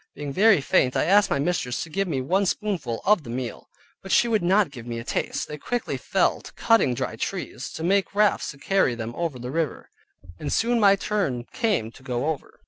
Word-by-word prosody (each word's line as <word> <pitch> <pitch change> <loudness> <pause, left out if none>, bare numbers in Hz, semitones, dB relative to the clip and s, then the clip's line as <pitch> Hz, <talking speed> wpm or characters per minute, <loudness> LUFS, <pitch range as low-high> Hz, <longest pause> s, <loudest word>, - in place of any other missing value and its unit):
Being 145 -1 -5
very 200 -2 +5
faint 130 -1 +2
I - - +2
asked 200 +5 +4
my - - +1
mistress 140 -5 -1
to 165 - -10
give 195 +3 -1
me 135 -6 -1
one 190 +9 +1
spoonful 175 - -2
of 210 -3 +4
the 130 - -11
meal, 125 0 -5 0.3
but 195 - -8
she 240 - +4
would 220 -2 +1
not 185 -1 +3
give 120 -4 -10
me 120 -1 -4
a 115 - -5
taste. - - -2
They 150 0 -7
quickly 245 +8 -2
fell - - 0
to - - -12
cutting 225 - +3
dry 130 +1 -3
trees, - - -4
to 160 - -6
make 195 +2 +1
rafts 210 0 +2
to 140 - -9
carry 165 -5 +1
them 115 0 -5
over 165 -6 -2
the 125 +1 -6
river: 160 -2 -3 0.5
and 145 - -4
soon 235 +1 +2
my 200 -2 +6
turn 195 - -1
came 210 - 0
to 130 - -17
go 130 +3 -2
over. 150 - -9
165 Hz, 220 wpm, -24 LUFS, 130-200 Hz, 0.5 s, my